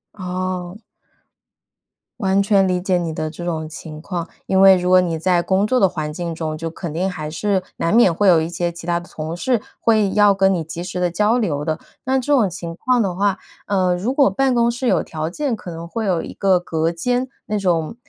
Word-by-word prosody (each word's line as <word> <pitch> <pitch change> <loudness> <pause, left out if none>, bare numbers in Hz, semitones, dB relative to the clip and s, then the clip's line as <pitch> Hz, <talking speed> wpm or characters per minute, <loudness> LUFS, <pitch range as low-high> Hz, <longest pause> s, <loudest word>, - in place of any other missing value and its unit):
哦。 185 0 -4 1.4
完 195 -2 +2
全 195 -1 +3
理 180 -1 +1
解 185 0 +1
你 170 -2 -2
的 155 0 -3
这 170 +2 -9
种 160 -2 -3
情 155 0 -9
况， 175 -1 -4 0.2
因 190 0 +2
为 195 -1 +8
如 180 0 -1
果 185 0 +6
你 170 -2 -1
在 175 +1 +2
工 190 +3 +1
作 255 +4 +2
的 195 - +4
环 155 -4 -4
境 170 0 -4
中， 155 -1 -3
就 165 +1 -4
肯 165 -1 -6
定 180 +4 0
还 155 -4 -5
是 190 +4 -1
难 170 - +1
免 230 -7 +6
会 200 +5 +1
有 175 -3 +6
一 160 - -2
些 175 0 -2
其 170 -1 -10
他 170 0 0
的 175 - -14
同 160 +1 -5
事 240 +5 0 0.2
会 215 -4 +2
要 205 0 +5
跟 195 0 +3
你 170 -3 -1
及 165 +2 -6
时 180 0 -5
地 180 -1 +1
交 210 +7 +2
流 150 -11 -1
的。 155 -1 -1 0.2
那 265 0 +1
这 260 +3 -3
种 240 -7 +4
情 170 -1 -7
况 250 +6 +1
的 190 -4 -1
话， 195 0 +1 0.3
呃， 185 -3 +2
如 205 +9 -2
果 275 -1 +4
办 270 -1 +1
公 235 -1 +3
室 240 +2 -2
有 185 -8 +3
条 155 0 -4
件， 265 - -2
可 180 - -9
能 165 0 -7
会 225 +5 -3
有 180 -4 +1
一 - - -8
个 190 -2 +2
隔 165 -2 -1
间 245 +9 -1 0.2
那 210 - -1
种 175 -2 0
180 Hz, 250 characters per minute, -20 LUFS, 165-205 Hz, 1.4 s, 为